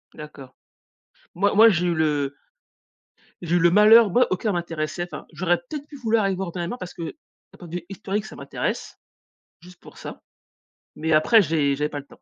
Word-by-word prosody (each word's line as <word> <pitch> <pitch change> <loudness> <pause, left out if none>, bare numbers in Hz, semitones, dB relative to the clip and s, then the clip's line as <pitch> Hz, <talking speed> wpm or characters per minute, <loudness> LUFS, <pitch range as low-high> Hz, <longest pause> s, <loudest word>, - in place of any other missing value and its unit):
D'accord. 140 -4 -11 0.8
Moi 200 +3 +1
moi, 220 +2 +8
j'ai 180 -4 +1
eu 175 - +1
le 145 -3 -1 1.1
j'ai 175 0 -1
eu - - +4
le 170 0 +4
malheur, 215 +2 +7
moi, 250 +6 +3
aucun 205 +4 -1
m'intéressait, 165 -1 -3
enfin, 175 - -9
j'aurais 175 +2 0
peut-être 295 -2 -6
pu 295 - -11
vouloir 225 -4 +1
aller 195 -1 +1
le - - -5
voir 190 -1 -4
Oppenheimer, 175 +4 -4
parce 180 - -8
que 170 - -7
d'un 300 - -13
point 175 - -11
de 165 - -8
vue 175 - -9
historique, 200 +2 -4
ça - - -11
m'intéresse, - - -5 0.6
juste 180 +1 -16
pour - - -15
ça. - - -9 0.7
Mais 160 0 -1
après, 215 +9 +5
j'ai 150 -5 +1
j'avais 150 +2 -2
pas 145 - -5
le 140 - -12
temps. - - -20
175 Hz, 200 wpm, -23 LUFS, 155-205 Hz, 1.1 s, moi